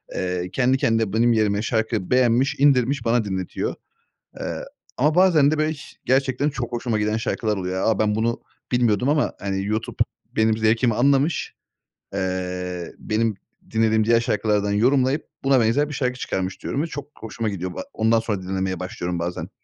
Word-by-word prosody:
eee, 90 -1 -2
kendi 130 0 +2
kendine 115 -5 +1
benim 120 +2 +4
yerime 105 -2 +1
şarkı 110 -4 -1
beğenmiş 130 +3 +3
indirmiş 135 -2 +3
bana 115 0 +2
dinletiyor. 95 -2 -3 0.7
Eee, - - -4 0.3
ama 150 +4 +2
bazen 170 -6 +5
de 155 - 0
böyle 155 0 +2
hiş 145 -2 -9
gerçekten 135 +2 +1
çok 125 -4 -5
hoşuma 115 -2 -1
giden 105 +1 0
şarkılar 110 -2 -1
oluyor. 95 0 -2
A, - - -3
ben 105 -1 +2
bunu 115 +2 0 0.3
bilmiyordum 120 -1 +2
ama 150 0 +2
hani 95 0 -2
YouTube 110 +2 -2 0.4
benim 110 0 +3
zevkimi 110 +2 +2
anlamış, 140 +6 +2 0.6
eee, 90 -1 -3
benim 110 -1 0 0.4
dinlediğim 110 0 +3
diğer 115 +1 +4
şarkılardan 105 -2 0
yorumlayıp 130 +7 +2 0.2
buna 135 -1 +4
benzer 120 +6 +2
bir - - -6
şarkı 125 -2 -2
çıkarmış, 95 -4 -3
diyorum 140 - -1
ve 160 - 0
çok 145 -2 -7
hoşuma 110 0 -3
gidiyor 90 -2 -4
bu - - -7
a - - -3
Ondan 115 +1 +3
sonra 110 -4 -2
dinlemeye 95 -1 -2
başlıyorum 90 -1 -4
bazen. 85 +1 -4
115 Hz, 170 wpm, -23 LUFS, 100-130 Hz, 0.7 s, bazen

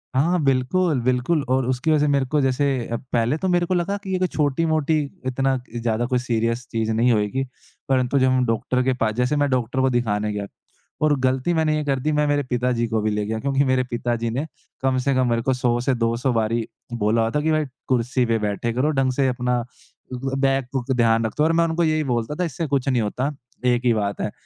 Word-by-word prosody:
हाँ, 170 +7 +2
बिल्कुल, 135 +4 +2
बिल्कुल 130 +6 +1
और 130 0 +2
उसकी 130 +5 0
वजह 155 - +4
से 150 - +2
मेरे 140 -2 +2
को 150 - +3
जैसे 135 +1 +1 0.2
अ, 115 - -3 0.2
पहले 120 +5 +2
तो 190 - -2
मेरे 175 -1 +2
को 185 - -1
लगा 180 +3 0
कि 195 -1 -7
ये - - +2
कोई 185 - +2
छोटी-मोटी, 155 +1 +1 0.3
इतना 135 +1 +1 0.2
ज़्यादा 115 0 0
कुछ 125 0 0
सीरियस 115 0 -1
चीज़ 110 -1 -1
नहीं 120 +3 +3
होएगी। 110 +5 0 0.5
परंतु 130 +1 +2
जब 130 - +3
हम 130 -1 +2
डॉकटर 125 +2 0
के 130 - +2
पास 110 -3 0
जैसे 125 +4 +1
मैं 145 -1 +2
डॉकटर 125 0 -1
को 130 - +3
दिखाने 105 -4 0
गया, 105 -1 -3 0.6
और 150 -1 +3
गलती 130 +5 +1
मैंने 160 -2 +2
ये 150 - -1
कर 135 -2 0
दी, 155 +4 -1
मैं 150 0 +1
मेरे 145 0 +1
पिताजी 125 -2 0
को 110 -1 0
भी 110 - 0
ले 105 0 -1
गया, 110 +1 -3
क्योंकि 140 +2 +1
मेरे 130 -1 +2
पिताजी 120 -1 -1
ने 130 +7 -2 0.4
कम 130 -1 +1
से 140 - +3
कम 130 -1 +2
मेरे 115 0 +1
को - - +4
100 120 -1 +1
से 130 - +3
200 120 +2 0
बारी 115 0 0 0.3
बोला 115 0 +1
हुआ 115 0 0
था 150 - 0
कि, 160 - +1
"भाई, 155 -1 +1 0.2
कुर्सी 125 0 +1
पे 115 -1 +1
बैठे 105 +2 -2
करो 135 +6 +1
ढंग 135 -2 +1
से 135 0 +1
अपना। 125 -1 0 0.5
उदु 130 +2 -3
अ, 135 - -2
बैक 135 -1 +2
बूक 135 0 -2
ध्यान 115 -1 +3
रख 110 - -3
तू।" 150 - +3
और 160 - +3
मैं 170 0 +3
उनको 165 +1 0
यही 155 -1 +1
बोलता 120 +5 -2
था, - - +2
"इससे 165 +1 -3
कुछ 140 -1 0
नहीं 125 -3 +2
होता, 125 +7 -1 0.3
एक 125 0 +2
ही 120 - +4
बात 100 -2 -2
है।" - - -2
130 Hz, 240 wpm, -22 LUFS, 115-145 Hz, 0.6 s, वजह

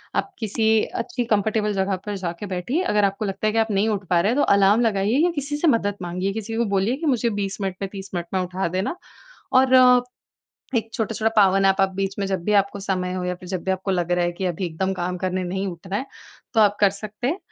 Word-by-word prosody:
आप 395 - -1
किसी 220 0 -1 0.3
अच्छी 245 +1 -3
कंफर्टेबल 210 -1 +1
जगह 190 0 0
पर 205 - -3
जाके 175 +2 -5
बैठिए। 245 - -1
अगर 210 - +2
आपको 200 +2 -1
लगता 200 +2 -2
है - - +2
कि 225 - +2
आप 220 -1 +1
नहीं 200 +3 +2
उठ 200 -3 -2
पा 175 -1 +4
रहे 205 - +1
हैं, - - 0
तो - - +4
अलार्म 200 +4 +4
लगाइए 215 +2 +1
या 355 - +2
किसी 290 +1 -3
से 330 - +1
मदद 205 -6 +2
माँगिए, 180 +3 -2
किसी 225 +1 -5
को 235 - +2
बोलिए 200 +7 +1
कि 325 - -5
मुझे 240 -3 +2
20 195 0 -3
मिनट 190 -1 -2
में, 195 - -2
30 195 -1 -8
मिनट 175 -1 -2
में - - +2
उठा 185 0 -2
देना 200 - -1 0.6
और 260 0 +5 1.0
एक 225 -1 -1
छोटा-छोटा 220 0 0
पावर 195 -1 +5
नैप 195 0 +3
आप 195 - +4
बीच 195 0 -2
में 200 - 0
जब 190 -3 -2
भी 210 - +1
आपको 200 0 -6
समय 185 -2 -2
हो, 185 -1 -3
या 180 0 -1
फिर 180 0 -12
जब 185 -3 -3
भी 190 - 0
आपको 190 +1 -3
लग 175 -1 -1
रहा 175 0 +2
है 175 - -1
कि 185 +2 -5
अभी 180 +1 -2
एकदम 190 +4 -2
काम 180 0 -3
करने 185 0 -1
नहीं 190 +2 -2
उठना 185 +3 -5
है। 265 - -3 0.5
तो 220 - +4
आप 205 -1 +4
कर 200 - +5
सकते 215 +4 -6
हैं 335 +7 -1
195 Hz, 255 wpm, -23 LUFS, 185-220 Hz, 1.0 s, और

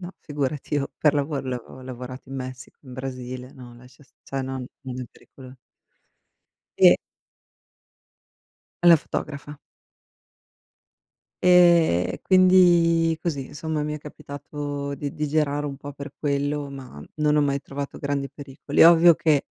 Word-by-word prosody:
No 175 -1 -7
figurati, 145 -1 -3
io 140 -1 -1
per 150 -1 +3
lavoro 145 0 -1
ho 135 - -10
lavo 125 -2 -4
ho - - -11
lavorato 130 0 -9
in 135 - -6
Messico, 130 -1 -8
in 130 -3 -12
Brasile, 130 0 -7
no, 125 -2 -13
lascia 125 +3 -18
st - - -33
cioè 135 - -4
non 130 -1 -5 0.2
non 130 -1 -6
è - - -4
pericolo 130 -1 -15 1.2
E - - +8 1.9
La 170 -2 +8
fotografa. 145 -1 -6 1.8
Ehm, 170 - +5
e - - -7
quindi 175 -3 +5
così, 140 -7 -3
insomma 150 0 -3
mi 150 - -3
è 150 - -6
capitato 145 -1 -6
di 140 0 -5
di 150 - -2
girare 145 -1 0
un 140 - -7
po' 145 +1 -9
per 140 0 -8
quello, 145 0 -1
ma 130 - -10
non 150 -1 +2
ho 150 - +4
mai 140 -1 0
trovato 140 0 -7
grandi 140 -1 -2
pericoli. 140 -2 0
Ovvio 170 0 +8
che, 150 -3 +1
145 Hz, 145 wpm, -24 LUFS, 130-150 Hz, 1.9 s, E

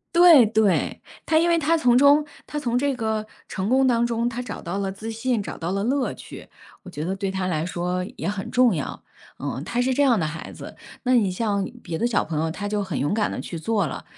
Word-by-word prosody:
对 340 -8 +8
对， 215 -3 +1 0.2
她 315 - +3
因 335 - +2
为 340 -1 +3
她 330 +1 +2
从 245 -6 +4
中 285 +3 +6 0.2
她 295 - -4
从 245 -4 -1
这 280 +2 +1
个 220 -2 -2 0.2
成 190 +1 -3
功 260 +1 +4
当 235 -1 +3
中， 235 0 0
她 240 0 -3
找 240 -4 -7
到 175 +2 -4
了 195 -1 -2
自 215 +4 -7
信， 230 0 -1
找 - - -7
到 170 +1 -3
了 195 +1 -1
乐 265 +2 0
趣， - - -11 0.3
我 190 - -10
觉 155 -3 -5
得 190 +2 -2
对 195 -1 -3
她 190 -1 -2
来 160 -3 -1
说 180 +1 -2
也 - - -3
很 200 -1 -4
重 245 -5 +4
要。 150 - -5 0.4
嗯， 130 - -4
她 240 +8 -1
是 260 +1 +1
这 285 - +2
样 245 -6 +4
的 160 - 0
孩 160 +2 -7
子， - - -10 0.3
那 255 - +2
你 205 -6 +3
像 200 0 -1 0.2
别 170 -3 -4
的 230 - 0
小 235 -4 +1
朋 155 -2 -4
友， 160 0 -1
他 205 +5 -4
就 205 0 -1
很 180 -7 -3
勇 145 +7 0
敢 210 -1 0
地 - - -4
去 170 - -6
做 200 +4 0
了， - - -6
220 Hz, 265 characters per minute, -24 LUFS, 185-250 Hz, 0.4 s, 对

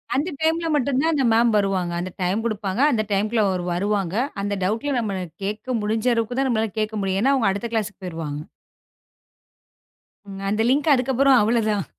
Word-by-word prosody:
அந்த 290 +7 0
டைம்ல 325 +1 +1
மட்டும் 275 -2 +1
தான் 325 +2 +2
அந்த 280 -3 +1
மேம் 230 +1 +4
வருவாங்க. 195 -3 0
அந்த 185 +1 -5
டைம் 190 +5 0
குடுப்பாங்க. 210 -1 -2
அந்த 215 -4 +1
டைம்க்குள்ள 215 +3 +1
அவரு 185 -2 -2
வருவாங்க. 195 0 -1 0.3
அந்த 205 0 -1
டவுட்ல 225 +9 -1
நம்ம 200 -5 -2 0.3
கேக்க 215 +5 -3
முடிஞ்ச 220 +3 -1
அளவுக்குத் 230 +2 -1
தான், 270 - +2
நம்மளால 220 -4 0
கேக்க 215 0 -2
முடியும். 195 0 0
ஏன்னா 270 +4 +3
அவுங்க 230 -7 +2
அடுத்த 205 +4 -4
க்ளாஸ்க்கு 210 -3 -2
போயிருவாங்க. 155 -4 -5 2.0
அந்த 210 +2 0
லிங்க் 290 +3 +3
அதுக்கப்புறம் 265 +1 +3
அவ்ளதான். 215 -3 +1
215 Hz, 165 wpm, -23 LUFS, 195-250 Hz, 2.0 s, மேம்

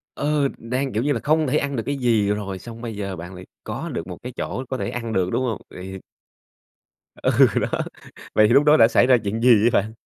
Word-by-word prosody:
Ờ, 145 -1 +1
đang, 125 +2 -3
kiểu 110 +3 0
như 145 - +1
là, 115 - -2
không 155 0 +2
thể 145 +4 +1
ăn 140 -1 -2
được 115 - -2
cái 140 - -1
gì 115 -5 +2
rồi, 100 -2 -3
xong 115 +2 -10
bây 115 -3 -5
giờ 100 -2 -4
bạn 90 +2 -9
lại 90 0 -10 0.2
có - - -5
được 85 - -5
một 90 - -7
cái 125 - -6
chỗ 130 - -4
có 130 - -2
thể - - -3
ăn 115 -2 -4
được, 90 -1 +1
đúng 130 - 0
hông? 115 -4 -2
Vậy 90 - -10
thì 95 0 -7 1.2
Ừ, - - 0 0.3
đó, - - 0 0.7
Vậy 110 0 +5
thì - - +2
lúc 140 - +6
đó 150 +1 +5
đã 115 - +7
xảy 120 +2 +3
ra 130 - +6
chuyện 105 +3 -2
gì 125 - +4
vậy 115 - +4
bạn? 110 +3 -8
115 Hz, 255 wpm, -22 LUFS, 100-130 Hz, 1.2 s, đã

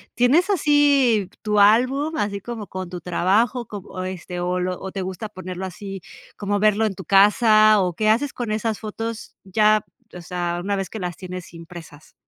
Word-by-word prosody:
¿Tienes 290 +11 +3
así 285 - +3
tu 210 -1 +1
álbum, 255 +9 +3
así 200 -1 -2
como 225 -1 -7
con 185 0 -6
tu 180 0 -6
trabajo 210 +8 +1
com 205 -2 -8
o, 185 - -6
este, 180 -1 -6
o 180 +1 -1
lo 180 0 -2
o 190 - -6
te 195 - -4
gusta 190 +3 -5
ponerlo 185 -2 -7
así 195 +1 -7 0.3
como 205 0 -2
verlo 215 +1 +3
en 200 -3 -2
tu 190 - -9
casa? 215 +2 +5
¿O 180 -2 -1
qué 215 +5 0
haces 255 +6 +1
con 240 -3 -4
esas 220 0 -2
fotos 225 +1 -6
ya, 215 +2 +2 0.3
o 180 - -8
sea, 175 0 -3
una 200 +1 -1
vez 195 -1 -3
que 220 - -7
las 180 -2 -4
tienes 185 -1 -8
impresas? 165 -2 -12
205 Hz, 190 wpm, -22 LUFS, 185-225 Hz, 0.3 s, casa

